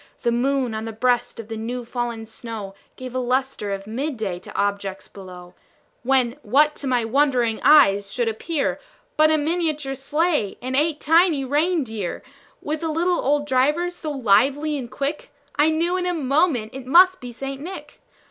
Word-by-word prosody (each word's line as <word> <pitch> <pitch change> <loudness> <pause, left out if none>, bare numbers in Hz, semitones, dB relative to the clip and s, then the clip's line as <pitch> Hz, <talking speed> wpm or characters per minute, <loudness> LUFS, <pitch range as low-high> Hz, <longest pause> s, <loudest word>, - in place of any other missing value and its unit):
The 235 - +2
moon, 255 0 0
on 220 0 -4
the 225 - -4
breast 245 +2 0
of 225 - -7
the 225 - -5
new 240 +2 -4
fallen 235 -2 -4
snow, 220 -3 -7 0.2
Gave 255 -1 -8
a 255 - -1
lustre 255 -3 -1
of 195 0 -4
mid 260 +6 -3
day 195 -5 -3
to - - -13
objects 200 -1 -2
below; 180 -2 -12 0.5
When, 255 0 +1
what 295 +7 +3
to 280 - -5
my 245 -3 +1
wondering 245 -3 +1
eyes 200 -10 +5
should 240 -2 -1
appear, 275 +7 -2 0.4
But 310 0 +5
a 310 - +3
miniature 305 -3 -1
sleigh, 290 - -1
and 255 +1 -4
eight 300 +1 +1
tiny 325 -3 +3
rein 310 +4 +1
deer, 220 -7 -5 0.4
With 300 +1 -3
a 325 - -2
little 345 +3 +1
old 290 +1 +1
driver, 295 +6 +1
so 330 -3 -6
lively 275 +4 +2
and 255 -4 -5
quick, 280 +4 -4 0.2
I 295 +2 +4
knew 335 +3 0
in 360 -1 -1
a 355 - 0
moment 275 -5 +1
it 265 -1 -8
must 370 +6 +6
be 245 -1 -7
St. 270 +3 -6
Nick. 370 +5 -9
265 Hz, 180 wpm, -22 LUFS, 225-305 Hz, 0.5 s, must